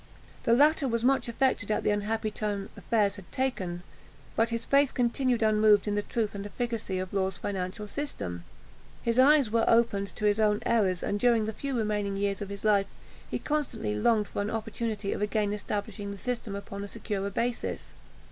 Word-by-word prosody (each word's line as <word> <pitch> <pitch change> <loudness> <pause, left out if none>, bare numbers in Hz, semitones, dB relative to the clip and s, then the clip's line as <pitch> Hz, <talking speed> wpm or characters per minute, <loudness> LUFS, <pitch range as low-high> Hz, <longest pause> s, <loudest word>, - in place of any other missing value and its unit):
The 230 - +4
latter 295 +1 +4
was 230 -1 -1
much 270 +1 +3
affected 235 -3 0
at 215 - +1
the - - +2
unhappy 215 +1 -1
turn 205 -2 -3
affairs 205 -3 +1
had 195 - -12
taken, 185 -10 -2 0.5
but 225 +1 +2
his 230 0 -3
faith 280 -1 +3
continued 245 -1 +1
unmoved 215 -1 +4
in 205 - +1
the 205 - +1
truth 220 0 -2
and 200 -1 -5
efficacy 215 -2 -3
of 185 +1 -4
Law's 190 -1 0
financial 195 +2 -4
system. 145 - -5 0.6
His 235 +1 +1
eyes 275 -3 +6
were 230 0 +3
opened 225 -4 +2
to 210 - -2
his 205 +1 +3
own 210 -1 +2
errors; 195 -6 +2
and 205 - -1
during 235 -2 +3
the 220 - -3
few 270 +4 -3
remaining 210 -3 -1
years 200 0 -1
of 200 - -4
his 200 +1 -7
life 200 -2 +4 0.4
he - - -1
constantly 290 - -2
longed 210 - +2
for - - -3
an 205 - -2
opportunity 220 -2 -3
of - - -5
again 210 0 0
establishing 205 -1 -4
the 200 - -6
system 235 -2 -3
upon 200 0 -6
a - - -5
securer 200 -2 -3
basis. 235 +4 -3
210 Hz, 190 wpm, -29 LUFS, 200-235 Hz, 0.6 s, eyes